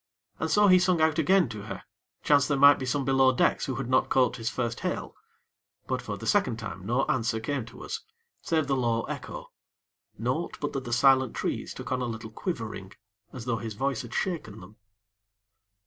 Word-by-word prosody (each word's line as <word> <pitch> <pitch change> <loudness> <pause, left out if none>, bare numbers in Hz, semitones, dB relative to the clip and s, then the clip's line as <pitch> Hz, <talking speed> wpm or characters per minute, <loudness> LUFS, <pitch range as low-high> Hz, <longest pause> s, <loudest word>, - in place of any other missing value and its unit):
And 160 - -1
so 210 +4 +4
he 185 -1 +7
sung 180 -1 +2
out 160 0 +2
again 185 +2 +4
to 105 -2 -7
her, - - -7 0.4
chance 140 -1 +4
there 145 - +1
might 140 +1 +7
be 130 - -4
some 135 +2 0
below 135 -1 +4
decks 125 - +1
who 130 - -2
had 135 -3 -4
not 130 +1 +2
caught 125 -3 +2
his 115 -1 -2
first 120 -2 -3
hail; - - -3 0.7
but, - - -2
for - - -5
the - - -8
second 110 - +2
time, 105 -4 -7
no 125 +4 +1
answer 115 -2 0
came 130 +1 -3
to 115 - -11
us, - - -4 0.4
save 160 -2 0
the 135 -1 0
low 115 -3 0
echo - - -7 0.7
naught, 125 +10 -2
but 145 - -3
that 135 -1 -4
the 120 - -5
silent 130 0 +4
trees - - -3
took - - -8
on 130 0 0
a - - -1
little 110 -1 -6
quivering, 110 - -5 0.4
as 125 -3 -8
though 120 -2 0
his 110 -1 -6
voice 135 +2 -1
had 120 -1 -9
shaken 160 - -3
them. 100 +4 -14
130 Hz, 205 wpm, -27 LUFS, 115-145 Hz, 0.7 s, he